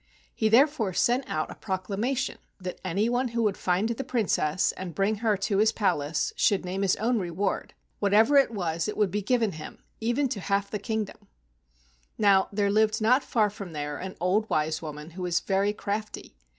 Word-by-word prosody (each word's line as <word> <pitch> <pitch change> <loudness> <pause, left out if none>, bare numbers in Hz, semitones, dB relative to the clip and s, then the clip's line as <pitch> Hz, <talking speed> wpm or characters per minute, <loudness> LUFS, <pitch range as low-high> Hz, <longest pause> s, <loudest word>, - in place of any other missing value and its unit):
He 220 - +1
therefore 235 -4 +3
sent 245 +8 +1
out 155 - -2
a - - -6
proclamation 215 +7 -2 0.2
that 185 -1 -6
any 190 +4 0
one 245 +2 +1
who 235 -1 -1
would 205 -3 +1
find 185 +4 0
the 235 +3 -3
Princess 215 - +1
and 180 -4 -7
bring 200 +4 +1
her 215 -1 +1
to 195 +1 0
his 220 +1 +4
palace 165 -8 0
should 195 -3 +2
name 185 +2 -3
his 195 -2 +2
own 230 +2 0
reward. 185 +2 -2 0.2
Whatever 215 +7 +4
it 275 - +5
was 170 -7 -2
it 210 - -3
should 210 -4 +2
be 205 +2 -1
given 225 0 +1
him, 155 -2 -10 0.2
even 240 +5 +1
to 215 - -3
the - - -9
half 200 0 +1
of - - -25
the 210 - -2
kingdom. 215 -1 -4 0.9
Now 195 -2 +4
there 200 -1 +1
lived 215 +1 +2
not 250 +5 +3
far 215 -3 +1
from 200 -4 -8
there 145 -1 -4
an 190 0 -6
old 195 +6 +1
wise 155 +1 0
woman 150 0 -7
who 185 +3 -8
was 175 -1 +1
very 195 +1 +1
crafty. 210 - -5
205 Hz, 200 wpm, -27 LUFS, 185-220 Hz, 0.9 s, it